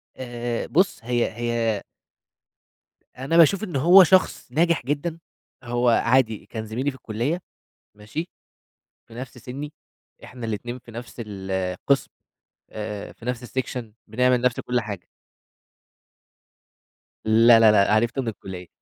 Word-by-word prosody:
آآ 120 -2 -4
بُص، 185 +6 +2
هي 120 0 0
هي 120 -3 -1 1.3
أنا 135 +6 0
باشوف 180 +6 +5
إن 180 - -5
هو 175 +8 +8
شخص 185 -7 +2
ناجح 165 -1 +2
جدًا، 155 +4 -2 0.4
هو 120 0 +1
عادي 115 -2 +2
كان 110 -1 -6
زميلي 125 +6 -2
في 130 - -14
الكُلّية 125 - -2 0.5
ماشي؟ 110 - -6 0.8
في 115 - -15
نفس 125 +1 -8
سِنّي، 145 +4 -7 0.5
إحنا 125 -2 -8
الاتنين 120 +3 -4
في 120 -1 -15
نفس 120 +1 -9
القسم، 95 +5 -1 0.6
آآ 105 -1 -6
في - - -17
نفس 125 0 -3
السكشن، 125 -3 -4
بنعمل 125 +3 +2
نفس 125 0 +1
كل 125 0 -1
حاجة. 100 -6 -7 2.2
لا 115 +1 +6
لا 110 -1 +7
لأ 105 0 +4
عرفته 120 +5 +1
من 125 - -6
الكُلّية. 95 -4 -7
120 Hz, 130 wpm, -24 LUFS, 110-135 Hz, 2.2 s, هو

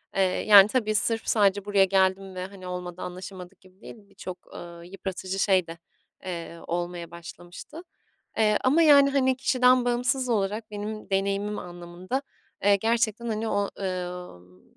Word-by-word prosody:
Eee, 195 - +2
yani, 200 +2 +6
tabii 215 -3 0
sırf 225 +2 0
sadece 205 -2 +2
buraya 200 -2 +4
geldim 190 0 +1
ve, 180 0 -4
hani, 190 -2 -11
olmadı 180 0 -6
anlaşamadık 185 +1 -9
gibi 185 +2 -22
değil, - - -10
birçok, 185 -2 -10
ııı, 170 0 -10
yıpratıcı 190 0 -5
şey 190 -4 +2
de, 165 +1 -8 0.5
eee, 170 -2 -6
olmaya 175 -1 -4
başlamıştı, 175 - -11 0.6
eee, 210 -1 +3
ama, 295 +6 +4
yani, 285 -3 +7
hani, 260 -2 +1
kişiden 255 -1 +3
bağımsız 250 +1 0
olarak 215 0 -1
benim 210 +1 -6
deneyimim 200 +2 -1
anlamında, 175 +8 -6 0.4
eee, 200 0 +5
gerçekten, 230 +2 0
hani, 220 0 -2
o 200 -1 0
ı - - -5
ımm, 180 - -6
195 Hz, 150 wpm, -26 LUFS, 180-220 Hz, 0.6 s, yani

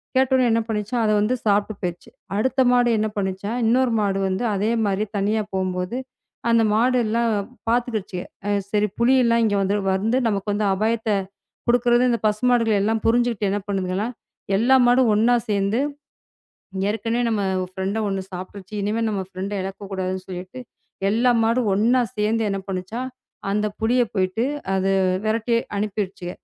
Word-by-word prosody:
கேட்ட 265 0 +3
உடனே 255 -2 +3
என்ன 230 0 +2
பண்ணுச்சாம்? 220 +2 -1
அதை 215 - +3
வந்து 230 +5 +1
சாப்பிட்டு 205 0 +1
போச்சு. 175 -1 -4 0.3
அடுத்த 260 +4 +1
மாடு 245 -1 +4
என்ன 215 - +1
பண்ணுச்சாம்? 200 +3 -2
இன்னொரு 250 +2 +3
மாடு 200 -2 0
வந்து 190 +6 -2
அதே 205 +3 0
மாதிரி 200 +1 0
தனியா 210 +2 +1
போகும்போது, 185 +3 -2 0.5
அந்த 230 -1 +4
மாடு 250 +4 +3
எல்லாம் 230 +1 +1 0.4
பாத்துக்கிருச்சுக, 220 -6 -1 0.2
அ - - 0 0.2
சரி, 210 0 +2
புலி 250 +3 +4
எல்லாம் 235 -1 +3
இங்க 205 -2 +1 0.4
வந்து 225 +5 +1
நமக்கு 205 0 -1
அந்த 210 0 0
அபாயத்தைக் 215 -2 0 0.4
குடுக்கறது" 240 0 +4
இந்த 235 - +1
பசுமாடுகள் 225 0 +2
எல்லாம் 220 +2 +1
புரிஞ்சுக்கிட்டு 235 -3 +2
என்ன 205 - 0
பண்ணுதுங்களா? 190 +1 -1 0.5
எல்லா 240 +6 +4
மாடும் 245 0 +4
ஒண்ணா 230 +4 +4 0.2
சேர்ந்து 200 +2 +1 1.1
"ஏற்கனவே 225 +2 -1
நம்ம 215 -2 0 0.3
ஃபிரெண்ட 190 +3 -2
ஒண்ணு 195 -1 -2
சாப்பிட்டுருச்சு. 185 +2 -8
இனிமே 215 +3 -1
நம்ம 205 -3 -1
ஃபிரெண்ட 190 +2 -5
இழக்கக்கூடாதுன்னு 190 -1 -4
சொல்லிட்டு, 185 +6 -7 0.5
எல்லா 235 +4 +3
மாடும் 230 0 +1
ஒண்ணா 235 +6 +3 0.2
சேர்ந்து 215 +2 +1
என்ன 195 0 -2
பண்ணுச்சாம்? 195 +7 -4 0.4
அந்த 210 +1 +1
புலிய 240 +3 +3
போயிட்டு, 190 +3 0 0.3
அதை 190 0 +1 0.3
விரட்டி 225 +2 +1 0.2
அனுப்பிடுச்சுக. 200 -3 -3
215 Hz, 150 wpm, -22 LUFS, 195-235 Hz, 1.1 s, மாடு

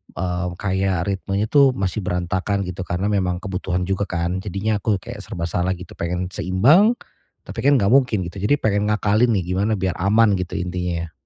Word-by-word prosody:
eee, 90 0 -2
kayak 95 -2 0
ritmenya 100 +2 -2
tuh 140 -3 +5
masih 95 0 -2
berantakan, 95 +2 -1
gitu. 90 0 -6
Karena 95 +4 -1
memang 90 -1 -1
kebutuhan 90 -2 -2
juga 95 +2 -1
kan. 90 +1 -2
Jadinya 105 +2 -2
aku 105 0 +1
kayak - - -8
serba 85 - -6
salah 90 +2 -1
gitu. 90 +1 -12
Pengen 90 +2 -2
seimbang, 150 - +4 0.5
tapi - - -8
kan 140 0 +4
enggak 100 -5 +2
mungkin, 120 -7 +3
gitu. 90 +3 -7
Jadi 105 +9 +2
pengen 105 -5 0
ngakalin 105 +2 +2
nih 95 - 0
gimana 100 +4 +1
biar 95 -2 -2
aman, 105 +3 +4
gitu 90 - -4
intinya. 90 -2 -3
95 Hz, 180 wpm, -21 LUFS, 90-105 Hz, 0.5 s, tuh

